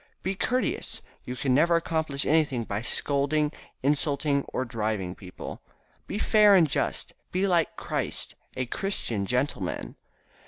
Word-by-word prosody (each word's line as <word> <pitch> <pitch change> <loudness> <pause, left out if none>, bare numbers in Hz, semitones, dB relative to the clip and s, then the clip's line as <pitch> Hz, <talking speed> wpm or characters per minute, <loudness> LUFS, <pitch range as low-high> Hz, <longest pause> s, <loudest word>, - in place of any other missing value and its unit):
"Be 190 - 0
courteous, 250 +6 -1 0.2
you 125 - -4
can 130 +1 +1
never 170 +5 +5
accomplish 160 -4 0
anything 150 -6 +2
by 105 -1 -3
scolding, 145 +4 +1 0.3
insulting 140 0 +2
or 130 - -1
driving 110 -6 -2
people. 90 -1 -8 0.5
Be - - -3
fair 210 -2 +6
and 170 -4 +6
just. - - -1 0.2
Be 185 +2 +1
like 175 -4 +2
Christ, - - -3 0.2
a 130 - 0
Christian 120 - -2
gentleman." 125 - -1
140 Hz, 130 wpm, -27 LUFS, 125-165 Hz, 0.5 s, fair